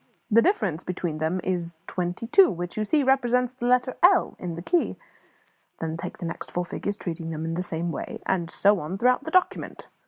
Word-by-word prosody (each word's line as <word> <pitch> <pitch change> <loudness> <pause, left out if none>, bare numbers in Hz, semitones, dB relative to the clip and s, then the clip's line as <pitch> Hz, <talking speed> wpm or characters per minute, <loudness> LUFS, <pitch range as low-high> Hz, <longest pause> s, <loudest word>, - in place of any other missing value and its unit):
The 230 +2 +7
difference 210 - +1
between 175 -3 -3
them 160 +4 0
is 170 -3 -2
twenty 180 +4 -3
two, 380 - +6
which, 175 -2 -4
you 215 - 0
see, 290 +7 +2
represents 250 -2 +2
the 245 -2 -3
letter 250 +1 +2
L 360 +1 +5
in 175 -2 -4
the 170 - -7
key. 345 - +1 0.8
Then 160 0 -3
take 165 - -6
the - - -6
next 165 - -5
four 175 0 -2
figures, 205 +3 -3
treating 165 -4 -5
them 160 0 -4
in 165 - -2
the 175 - -1
same 170 -1 -3
way, 140 - -5
and 175 -3 0
so 200 0 +3
on 155 +6 -4
throughout 250 +5 +2
the - - -3
document. 370 +2 0
185 Hz, 210 wpm, -26 LUFS, 170-250 Hz, 0.8 s, The